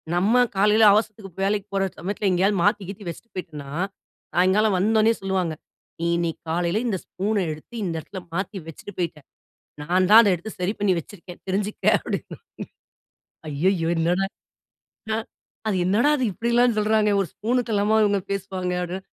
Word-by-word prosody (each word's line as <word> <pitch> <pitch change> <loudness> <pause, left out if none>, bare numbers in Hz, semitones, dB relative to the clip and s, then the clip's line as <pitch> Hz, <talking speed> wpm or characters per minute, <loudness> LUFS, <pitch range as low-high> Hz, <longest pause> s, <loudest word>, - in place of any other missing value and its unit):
நம்ம 200 +7 +3 0.2
காலையில 210 +3 +4
அவசரத்துக்கு 215 -2 -1
வேலைக்கு 200 +1 0
போற 195 0 +1
சமயத்துல 200 +3 -1
எங்கேயாவது 190 +3 +2
மாத்தி, 205 +1 +2
கீத்தி 200 +1 -8
வச்சுட்டு 205 +5 -10
போயிட்டன்னா, 155 -6 -7 0.7
சாயங்காலம் 190 +3 +3
வந்தோனே 220 +3 +3
சொல்லுவாங்க. 190 -4 -1 0.5
நீ 170 - -2
இன்னைக்கு 170 -1 -2
காலையில 175 +4 0
இந்த 205 -5 0
ஸ்பூன 205 +2 -1
எடுத்து 155 +9 -10
இந்த 170 -3 -2
இடத்துல 190 +5 -8
மாத்தி 195 +3 -3
வச்சுட்டு 165 +5 -10
போயிட்ட. 165 -3 -2 0.6
நான்தான் 185 +7 +6
அத 210 - +3
எடுத்து 175 +5 -6
சரி 180 +3 0
பண்ணி 205 -2 +2
வச்சிருக்கேன். 175 +1 -10
தெரிஞ்சுக்க 200 +2 -2
அப்படின்னுவாங்க. - - -6 1.1
"அய்யயோ! 165 +3 +1
என்னடா 175 +4 +1 0.8
நா 220 - +1 0.5
அது 205 - +1
என்னடா 210 +10 +3
இது 260 - -1
இப்பிடியெல்லாம் 235 +3 +2
சொல்றாங்க. 215 0 +3
ஒரு 190 - -1
ஸ்பூனுக்கெல்லாம 220 -2 +1
இவுங்க 200 -1 +2
பேசுவாங்க?" 190 -2 -3
அப்படின்னா 185 +2 -5
195 Hz, 145 wpm, -24 LUFS, 180-210 Hz, 1.1 s, நான்தான்